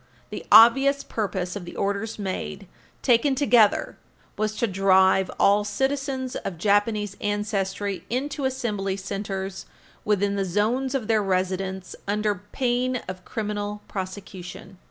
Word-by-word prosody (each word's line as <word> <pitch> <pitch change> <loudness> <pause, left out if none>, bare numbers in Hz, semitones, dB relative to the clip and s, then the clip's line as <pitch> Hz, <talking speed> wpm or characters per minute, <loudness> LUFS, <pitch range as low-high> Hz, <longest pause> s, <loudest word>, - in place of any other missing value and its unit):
The - - -6
obvious 270 +6 +7
purpose 190 -4 -3
of 200 - -5
the 175 - -9
orders 200 +3 -2
made, 195 0 -4 0.4
taken 260 +2 +3
together, 240 -6 +3 0.4
was 215 0 -1
to 235 - +1
drive 190 -1 +3
all 205 +1 +4
citizens 265 +4 -2
of 175 - -5
Japanese 205 +2 +1
ancestry 205 -2 -2
into 275 +3 -2
Assembly 210 -7 -2
Centers 195 -1 -5 0.4
within 205 -1 +1
the 195 - +1
zones 225 +9 0
of 240 -6 -2
their 220 -2 +3
residence, 190 0 -2
under 205 -2 0
pain 250 -1 0
of 185 0 -7
criminal 210 -2 -4
prosecution. 190 -1 -7
205 Hz, 125 wpm, -25 LUFS, 195-235 Hz, 0.4 s, obvious